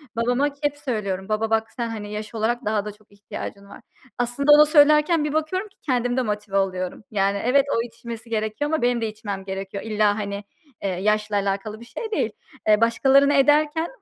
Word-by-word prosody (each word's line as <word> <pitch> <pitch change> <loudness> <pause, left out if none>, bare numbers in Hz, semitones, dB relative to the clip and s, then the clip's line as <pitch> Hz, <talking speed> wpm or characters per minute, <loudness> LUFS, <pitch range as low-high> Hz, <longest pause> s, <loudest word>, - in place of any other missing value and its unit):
Babama 245 +5 +1
hep 290 0 0
söylüyorum. 210 -8 -3
"Baba, 215 +1 0
bak, 225 0 0
sen, 235 -2 -4
hani, 210 -2 -6
yaş 215 +2 -6
olarak 240 +3 -1
daha 210 -1 0
da 210 - -4
çok 210 0 -23
ihtiyacın 200 0 -8
var." - - -12 0.4
Aslında 245 +4 +1
onu 300 +1 +9
söylerken 300 +1 +5
bir 300 0 -2
bakıyorum 340 +6 -1
ki 390 - -27
kendim 245 -3 0
de 260 - +3
motive 210 -3 -2
oluyorum. 185 0 -2
Yani, 200 0 +1
evet, 275 +2 +4
o 230 - +2
içmesi 230 -1 -8
gerekiyor 220 +7 -2
ama 315 - 0
benim 245 -1 +1
de 225 - 0
içmem 205 -3 -6
gerekiyor. 195 +1 -5
İlla, 215 -2 +2
hani, 200 0 -4 0.4
eee, 195 - 0
yaşla 210 +3 0
alakalı 200 +2 -2
bir 235 - -12
şey 440 - -6
değil. - - 0 0.4
Eee, 215 +1 +5
başkalarını 270 +5 +4
ederken 300 +4 +3
225 Hz, 195 wpm, -23 LUFS, 205-275 Hz, 0.4 s, onu